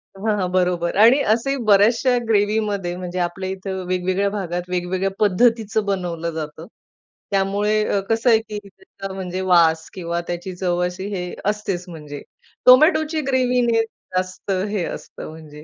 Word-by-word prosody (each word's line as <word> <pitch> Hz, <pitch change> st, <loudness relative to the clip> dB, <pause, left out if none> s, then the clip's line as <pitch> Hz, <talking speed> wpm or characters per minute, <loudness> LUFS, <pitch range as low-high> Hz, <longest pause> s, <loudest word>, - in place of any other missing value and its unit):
हां, 210 Hz, +2 st, -1 dB
हां. 185 Hz, -, 0 dB
बरोबर, 180 Hz, -2 st, 0 dB
आणि 230 Hz, +7 st, +7 dB
असेही 275 Hz, +5 st, -1 dB
बऱ्याचशा 225 Hz, +5 st, +4 dB
ग्रेव्हीमध्ये 205 Hz, -4 st, +1 dB
म्हणजे 180 Hz, 0 st, -5 dB
आपल्या 180 Hz, +2 st, -2 dB
इथं 190 Hz, 0 st, -4 dB
वेगवेगळ्या 185 Hz, +2 st, 0 dB
भागात, 180 Hz, -4 st, -3 dB
वेगवेगळ्या 180 Hz, +2 st, -1 dB
पद्धतीचं 220 Hz, +1 st, +2 dB
बनवलं 175 Hz, -4 st, -2 dB
जातं. 155 Hz, +1 st, -6 dB, 0.6 s
त्यामुळे 205 Hz, +2 st, +1 dB
अ, 200 Hz, -, +1 dB
कसं 225 Hz, +2 st, +2 dB
आहे, 225 Hz, -2 st, +6 dB
की 220 Hz, -1 st, -7 dB
त्याचा 195 Hz, -, -10 dB
म्हणजे 185 Hz, -1 st, -4 dB
वास 160 Hz, -2 st, +4 dB
किंवा 170 Hz, -2 st, -3 dB
त्याची 175 Hz, +2 st, -4 dB
चव 180 Hz, -1 st, -1 dB
अशी 180 Hz, +2 st, -5 dB
हे 180 Hz, -1 st, -4 dB, 0.2 s
असतेच 200 Hz, -4 st, -3 dB
म्हणजे. 150 Hz, -4 st, -8 dB, 0.4 s
टोमॅटोची 310 Hz, +4 st, +5 dB
ग्रेव्हीने 250 Hz, -3 st, +2 dB
जास्त 185 Hz, -3 st, -5 dB, 0.2 s
हे 205 Hz, -4 st, -1 dB
असतं -, -, -8 dB
म्हणजे. 155 Hz, -1 st, -12 dB
190 Hz, 140 wpm, -21 LUFS, 180-215 Hz, 0.6 s, आणि